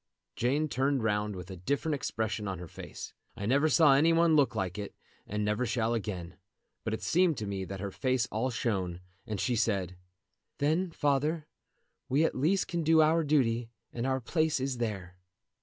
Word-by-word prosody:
Jane 140 +6 +1
turned 135 -2 0
round 105 -1 0
with 90 +1 -8
a - - -6
different 140 - -1
expression 110 -5 -2
on 95 -1 -3
her 90 0 -8
face. - - -9 0.2
I 100 - -5
never 140 +7 +3
saw 155 -3 +6
any 155 +5 +5
one 165 -1 +4
look 145 -3 +3
like 95 +1 -2
it, 100 - -6 0.3
and 105 +1 -2
never 105 +4 0
shall 115 -1 0
again; 95 -6 -4 0.5
but 110 -1 -1
it - - -9
seemed 175 -4 +3
to 105 - -3
me 100 -1 -3
that 95 +1 -6
her 100 0 -4
face 130 +2 0
all 115 +5 0
shone, 95 -7 -2 0.3
and 105 -3 -3
she 125 +3 +1
said: 95 -5 0 0.6
"Then, 160 +6 +1
father, 150 +1 0 0.6
we 145 +5 +3
at - - 0
least 170 +9 +1
can 170 -1 -2
do 160 0 +4
our 160 +2 +3
duty, 120 -6 +1 0.2
and 120 +2 -2
our 130 0 +1
place 155 +4 0
is 130 -2 -2
there." 95 -6 -4
120 Hz, 190 wpm, -30 LUFS, 105-150 Hz, 0.6 s, saw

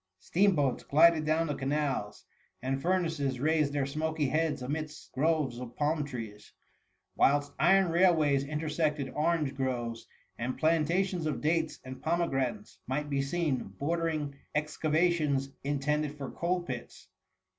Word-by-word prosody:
Steam 185 - +2
boats 140 -5 0
glided 160 +1 +5
down 160 +2 +2
the 150 - -2
canals, 135 -6 -2 0.3
and 135 +1 -2
furnaces 160 -7 0
raised 155 0 +2
their 145 -1 0
smoky 155 0 -1
heads 155 -2 0
amidst 150 +3 -5
groves 145 -4 0
of 120 -1 -8
palm 150 +1 +1
trees; 110 -7 -8 0.6
whilst 145 +1 +3
iron 190 +5 +5
railways 160 -6 +4
intersected 150 -1 -1
orange 155 -2 0
groves, 120 -4 -3 0.3
and 125 +2 -2
plantations 165 +2 +1
of 150 - -2
dates 160 +1 0
and 130 0 -9
pome 170 +2 +1
granates 135 +11 -2
might 145 +3 -2
be 140 -1 +1
seen 145 -1 0 0.2
bordering 155 -1 -1 0.2
excavations 150 -2 +1
intended 150 +1 -1
for 140 -2 -5
coal 175 +1 -1
pits. 125 -7 -7
150 Hz, 135 wpm, -30 LUFS, 135-165 Hz, 0.6 s, glided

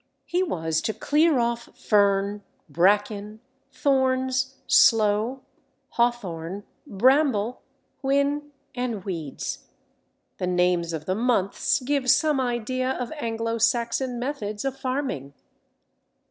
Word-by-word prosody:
He 355 - 0
was 160 - -1
to 220 - -2
clear 305 0 +3
off 235 0 -1
fern, 200 -1 +2 0.3
bracken, 205 +6 +1 0.3
thorns, 265 -1 +1
sloe, 225 -1 +4 0.5
hawthorn, 200 -6 -1 0.2
bramble, 250 0 +2 0.4
whin, 280 +2 0 0.2
and 240 -6 -3
weeds. 165 -8 -5 0.7
The 180 - -1
names 180 -1 +1
of 155 -2 -5
the 185 - 0
months 225 +2 +1
give 270 0 0
some 300 -1 +4
idea 255 +1 -1
of 250 -2 -5
Anglo 230 -5 -3
Saxon 240 +2 +1
methods 240 -4 -4
of 270 -1 -1
farming. 255 - -3
235 Hz, 105 wpm, -25 LUFS, 200-265 Hz, 0.7 s, sloe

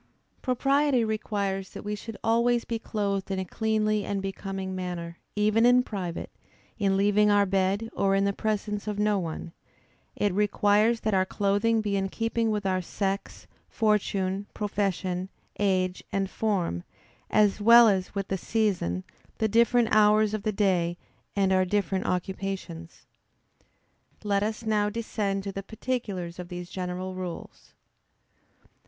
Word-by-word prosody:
_ - - -35
Propriety 275 0 +2
requires 200 -3 -2
that - - -8
we 210 - -3
should 215 +1 -7
always 235 +1 +2
be 230 -1 -3
clothed 200 -3 -2
in 195 - -1
a 190 - -2
cleanly 215 +1 0
and 200 0 -2
becoming 195 -1 -4
manner, 175 -2 -5 0.2
even 215 +2 +3
in 245 +1 +6
private, 185 -7 -5 0.5
in 195 -2 +2
leaving 205 +1 +4
our 205 -1 +4
bed, 195 +3 0
or 195 -1 +2
in 195 0 +2
the 200 - +1
presence 210 0 -2
of 210 -1 -2
no 210 -1 +2
one. 165 -1 -5 0.6
It 205 -2 0
requires 210 +3 +3
that 215 - 0
our 190 -1 +4
clothing 205 +4 +1
be 205 -2 -1
in 195 0 -1
keeping 230 +2 -1
with 210 -2 -1
our 185 -1 +1
sex, 195 +2 -3 0.2
fortune, 200 -2 0
profession, 190 -3 -2 0.3
age, 185 -2 +1
and 195 -1 0
form, 185 - -1 0.5
as 210 -1 +3
well 235 +2 +8
as 190 -1 0
with 200 -1 -3
the 190 - -1
season, 185 - 0 0.3
the 220 - +1
different 235 +2 +3
hours 215 0 +4
of 215 - -2
the 215 +1 0
day 185 -4 +1 0.4
and 195 -1 +2
our 185 0 +4
different 190 0 -1
occupations. 180 -2 -4 1.2
Let 200 -1 +1
us 220 +2 -3
now 210 -1 +2
descend 210 -3 -2
to 200 - -4
the 195 - -5
particulars 200 -6 -4
of 180 - -6
these 175 0 -7
general 185 0 -4
rules. 180 -2 -8
200 Hz, 150 wpm, -27 LUFS, 190-215 Hz, 1.2 s, well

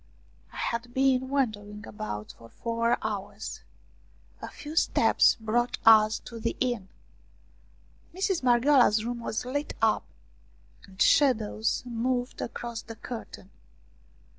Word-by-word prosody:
I - - -12
had 235 +1 -3
been 260 -1 +2
wandering 210 -6 -2
about 210 - -6
for 115 - -15
four 230 - 0
hours. 210 -3 -5 0.8
A - - -6
few 300 +1 -9
steps - - +4
brought 240 +2 0
us 220 -1 +7
to 235 -1 -9
the 230 +1 -2
inn. 240 -7 -1 1.2
Mistress 380 0 -1
Marghioala's 245 -3 +4
room 240 0 -3
was 230 0 -3
lit 285 +4 -3
up - - +2 0.8
and 190 -1 -18
shadows 225 -6 +2
moved 245 +1 -2
across 235 -1 -5
the 225 - -10
curtain. 220 -4 -9
235 Hz, 115 wpm, -28 LUFS, 215-255 Hz, 1.2 s, us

